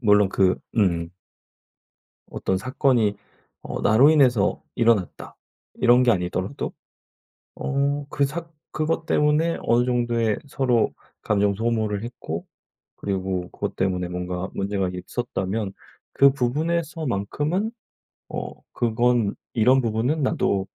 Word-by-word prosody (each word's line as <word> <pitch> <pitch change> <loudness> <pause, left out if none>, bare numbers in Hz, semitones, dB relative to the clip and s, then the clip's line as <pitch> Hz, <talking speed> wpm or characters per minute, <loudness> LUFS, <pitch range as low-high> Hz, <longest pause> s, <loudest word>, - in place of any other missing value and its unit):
물론 105 -4 +4
그 95 -2 +2 0.2
음. 85 -6 +1 1.2
어떤 95 - -1
사건이 120 -2 +1 0.5
어 - - -5
'나로 120 +8 +6
인해서 130 -9 +3
일어났다.' 115 -6 0 0.4
이런 125 +1 +5
게 125 - +4
아니더라도 90 -3 -2 0.8
어 140 +1 -1
그 140 - +1
사 165 +4 -5 0.2
그것 155 +1 -1
때문에 150 +2 +2
어느 120 +1 +3
정도의 120 -3 +1
서로 130 -4 +1 0.3
감정 100 -1 +2
소모를 110 -2 -1
했고 85 -9 -6 0.5
그리고 95 -2 -3
그것 - - -4
때문에 90 -1 0
뭔가 90 +1 -3
문제가 95 -1 -1
있었다면 100 0 -3 0.4
그 140 0 +6
부분에서 155 +5 -1
만큼은 150 - -1 0.6
어 - - -5 0.2
그건 120 -2 +1 0.2
"이런 125 +4 +4
부분은 120 +7 0
나도 100 -7 +1
115 Hz, 240 characters per minute, -24 LUFS, 100-135 Hz, 1.2 s, 나로